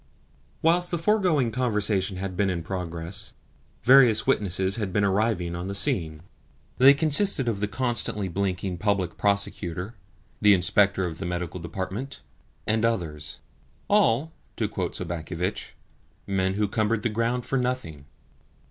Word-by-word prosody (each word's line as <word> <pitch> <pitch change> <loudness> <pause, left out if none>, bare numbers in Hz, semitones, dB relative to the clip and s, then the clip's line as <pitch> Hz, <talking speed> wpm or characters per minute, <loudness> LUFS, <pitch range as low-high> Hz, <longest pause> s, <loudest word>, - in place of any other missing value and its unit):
Whilst 175 +2 +3
the 175 - -1
foregoing 165 - +2
conversation 105 -6 0
had 95 0 -5
been 100 +1 +1
in 85 -3 -3
progress, 90 +5 -5 0.5
various 125 -4 +6
witnesses 95 0 +1
had 105 -4 -3
been 105 +2 +1
arriving 100 -3 0
on 90 +2 -5
the 100 - -4
scene. 80 -5 +2 0.6
They 135 +2 +8
consisted 155 -1 +2
of 110 -4 -1
the 105 - -1
constantly 115 -4 -2
blinking 95 -1 -3
Public 100 -3 0
Prosecutor, 100 -1 -2 0.5
the 105 -1 +6
Inspector 95 +1 +3
of 80 -2 -5
the 95 - -4
Medical 90 0 -4
Department, 95 +9 -6 0.4
and 110 +1 0
others 80 -10 -2 0.5
all, 160 - +2 0.2
to - - -1
quote - - -4
Sobakevitch, 90 +2 -4 0.5
"men 95 -1 0
who 105 0 0
cumbered 110 +1 -1
the 120 - +1
ground 115 +3 -1
for 135 - 0
nothing." 125 - -3
100 Hz, 140 wpm, -25 LUFS, 90-120 Hz, 0.6 s, They